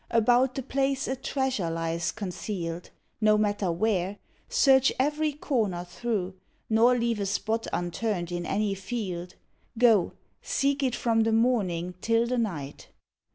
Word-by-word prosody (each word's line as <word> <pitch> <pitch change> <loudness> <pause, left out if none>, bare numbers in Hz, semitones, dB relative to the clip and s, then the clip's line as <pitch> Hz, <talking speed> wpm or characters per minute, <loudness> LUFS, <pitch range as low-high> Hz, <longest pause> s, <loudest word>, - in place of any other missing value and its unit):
About 245 +3 +3
the 270 - -3
place 270 +1 0
a 260 - -1
treasure 265 -8 -1
lies 165 +1 -2
concealed, 180 -4 -5 0.3
No 215 0 +5
matter 205 -3 0
where, 190 +1 0 0.3
search 270 - +5
every 300 +3 +1
corner 220 - -1
through, 190 0 -3 0.4
Nor 235 +3 +5
leave 235 -2 0
a 200 - -1
spot 220 +3 -1
unturned 175 0 -2
in 175 0 -3
any 200 +3 0
field. 190 -4 -5 0.4
Go, 220 -6 +4 0.3
seek 280 +1 0
it 255 -3 +1
from 225 -2 +1
the 225 0 +2
morning 200 -7 +1
till 230 +1 +2
the 250 +1 -1
night." 155 -11 -4
220 Hz, 140 wpm, -27 LUFS, 180-250 Hz, 0.4 s, No